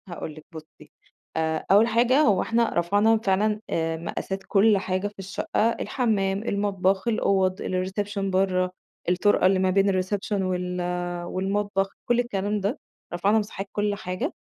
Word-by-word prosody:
هاقول 170 -3 -6
لِك 155 - -13
بُصي 160 -1 -13 0.5
آآ، 160 0 -1
أول 210 +3 +6
حاجة 240 +5 +3
هو 210 -11 +3
إحنا 230 0 +1
رفعنا 205 +6 +3
فعلًا 210 +1 +1
آآ، 165 0 -1
مقاسات 190 +3 -4
كُلّ 205 +1 +4
حاجة 190 +1 -1
في 205 -1 -12
الشقة، 200 +3 -1
الحمام، 200 -6 0
المطبخ، 195 -2 0
الأوض، 190 -4 +1
الreception 195 +3 -2
برّا، 185 -1 +1 0.4
الطُرْقة 185 +2 +3
اللي 190 0 +4
ما 185 0 +2
بين 195 0 +2
الreception 200 +1 -2
وال 180 -1 -2 0.4
والمطبخ، 195 +1 -1 0.2
كُلّ 240 0 +2
الكلام 205 -3 -1
ده، 205 +9 -2 0.3
رفعنا 200 +5 +2
مساحات 200 -2 -5
كُلّ 205 0 0
حاجة، 205 - -4
195 Hz, 145 wpm, -25 LUFS, 185-210 Hz, 0.5 s, أول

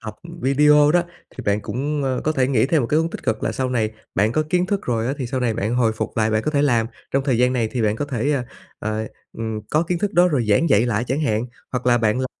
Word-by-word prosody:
học 110 -2 -7 0.3
video 150 +2 +5
đó, 175 -1 +4 0.3
thì 125 - -6
bạn 100 +1 +1
cũng, 145 +6 -3
ơ, 130 -2 -1
có 155 - +2
thể 130 -3 +1
nghĩ 125 -2 +2
thêm 155 0 +2
một - - -1
cái 150 - +2
hướng 165 +1 0
tích - - -7
cực 110 -3 -1
là - - 0
sau 130 -1 -2
này 110 -3 0 0.2
bạn 105 +4 +2
có 155 - +2
kiến 180 0 +2
thức 200 0 -1
rồi 115 -1 0
á, 135 - -1
thì 130 - -3
sau 130 +2 -3
này 115 -3 0
bạn 110 +5 -1
hồi 115 -3 +2
phục 110 - -5
lại 110 0 +2
bạn 110 0 +1
có - - -1
thể 145 -1 +1
làm. 120 -5 +2 0.2
Trong 135 0 0
thời 130 -5 +1
gian 125 +1 +3
này 115 -3 0
thì 120 -3 -1
bạn 105 0 +1
có 145 - -2
thể, 140 +1 -1
ơ, 135 -3 0 0.4
ờ, 110 +1 -3 0.3
ừm, 110 -1 -4
có 155 +2 +3
kiến 170 0 -2
thức 205 +2 -1
đó 180 +1 +5
rồi 130 -8 0
giảng 130 +11 +3
dạy 110 +1 +4
lại 115 0 0
chẳng 135 +5 -1
hạn, 115 -4 0 0.3
hoặc 125 -1 -3
là 120 -1 +4
bạn 110 +2 +1
làm 130 - 0
125 Hz, 295 wpm, -21 LUFS, 110-145 Hz, 0.4 s, video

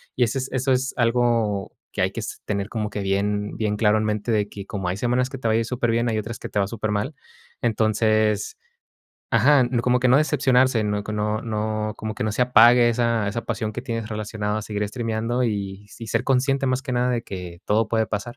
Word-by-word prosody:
Y 125 - +3
eso 120 +3 0
es 130 - -4
eso 130 +1 0
es 130 +1 0
algo 115 -4 +1 0.2
que - - -2
hay - - +1
que - - -6
es - - -6
tener 100 -1 -2
como 105 -2 -3
que 105 - -5
bien, 105 +1 -1
bien 105 -1 -1
claro 105 -1 +3
en - - -1
mente 105 +2 -1
de 105 -1 +1
que 100 -1 -8
como 95 -3 -4
hay 90 - -2
semanas 125 +3 +1
que 135 - -6
te 120 - -3
va 110 - +3
a - - +3
ir 115 - 0
superbién, 120 -1 0
hay 110 - 0
otras 110 +2 -5
que - - -7
te 105 - -1
va 100 - +1
supermal. 110 +4 -2 0.5
Entonces 110 - +1 0.7
ajá, 145 -3 +5 0.2
como 125 0 +3
que 125 - +3
no 125 - +6
decepcionarse. 130 -5 +3
No, 105 0 -1
que 110 - -5
no 105 +1 -1
no, 110 -1 -2
como 110 -1 -5
que - - -2
no 110 - -1
se 125 - +1
apague 120 0 +6
esa 115 -3 +1
esa 115 +3 -3
pasión 110 -1 -3
que - - -4
tienes 115 -3 -4
relacionado 105 -1 -3
a - - -5
seguir 105 -1 -3
estrimiando 115 +2 -1
y 100 -2 -3
sí 115 +2 -10
ser 115 +3 0
consciente, 135 +1 +1
más 130 0 0
que 130 -2 -4
nada, 125 +1 +1
de 120 -2 -1
que 90 -5 -8
todo 110 +1 +2
puede 110 -1 +1
pasar. 110 +3 -4
110 Hz, 230 wpm, -23 LUFS, 105-125 Hz, 0.7 s, no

